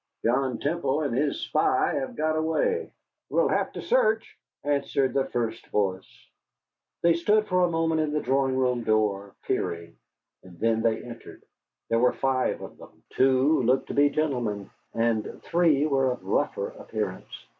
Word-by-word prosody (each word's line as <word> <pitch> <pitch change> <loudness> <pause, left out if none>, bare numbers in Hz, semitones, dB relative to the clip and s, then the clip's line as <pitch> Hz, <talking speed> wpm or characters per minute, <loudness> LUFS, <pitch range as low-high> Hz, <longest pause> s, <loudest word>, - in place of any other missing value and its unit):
"John 125 +1 +1
Temple 155 -1 -1
and 140 -6 -1
his 145 - 0
spy - - +1
have 260 -2 -3
got 155 -4 0
away." 160 - 0 0.4
"We'll - - +2
have - - +1
a - - -5
search," 225 - +1 0.3
answered 140 -2 0
the 135 -1 +1
first 115 -3 -3
voice. 95 -2 -1 0.9
They 170 0 +5
stood 210 +6 +2
for 180 -3 +1
a 175 - +3
moment 165 -1 +1
in 155 -1 -1
the 150 - 0
drawing 135 -1 +1
room 125 -2 +1
door, 105 -3 0
peering, 85 0 -3 0.5
and 90 -2 -16
then 115 0 +1
they 115 -1 0
entered. 120 -1 -11 0.5
There 115 - +2
were 125 +1 +3
five 130 -1 0
of - - -10
them. - - -16
Two 135 +3 +3
looked 130 +2 +1
to - - -3
be 145 0 +4
gentlemen, 120 -10 -2 0.2
and 115 -2 -1
three 165 -4 +3
were 135 -3 +2
of 125 - -13
rougher - - 0
appearance. - - -6
135 Hz, 160 wpm, -26 LUFS, 115-155 Hz, 0.9 s, They